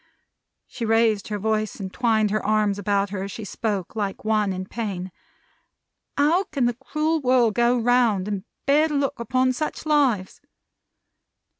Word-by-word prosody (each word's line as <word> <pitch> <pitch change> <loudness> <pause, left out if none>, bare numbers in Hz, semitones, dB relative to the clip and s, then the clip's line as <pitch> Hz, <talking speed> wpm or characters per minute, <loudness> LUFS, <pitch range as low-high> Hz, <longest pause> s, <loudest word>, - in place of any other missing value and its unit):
she 255 - -7
raised 225 -2 +2
her 210 - -3
voice 215 +1 -1
and 190 -2 -7
twined 220 -4 +2
her 215 - -1
arms 210 -2 +1
about 200 0 0
her 195 -2 -3
as 200 +1 -5
she 220 - -7
spoke, 205 -3 -3
like 205 -1 -3
one 215 -2 +1
in 185 0 -4
pain. 190 -4 -5 1.1
"How 325 +7 +3
can 275 -5 -1
the 240 - +1
cruel 305 +6 -1
world 250 -4 +3
go 240 +2 +3
round, 235 -5 +2
and 200 -2 -3 0.2
bear 295 +3 +4
to 300 - -3
look 280 -3 -1
upon 255 +2 +1
such 305 +4 -4
lives!" 265 -11 +1
225 Hz, 160 wpm, -23 LUFS, 205-255 Hz, 1.1 s, bear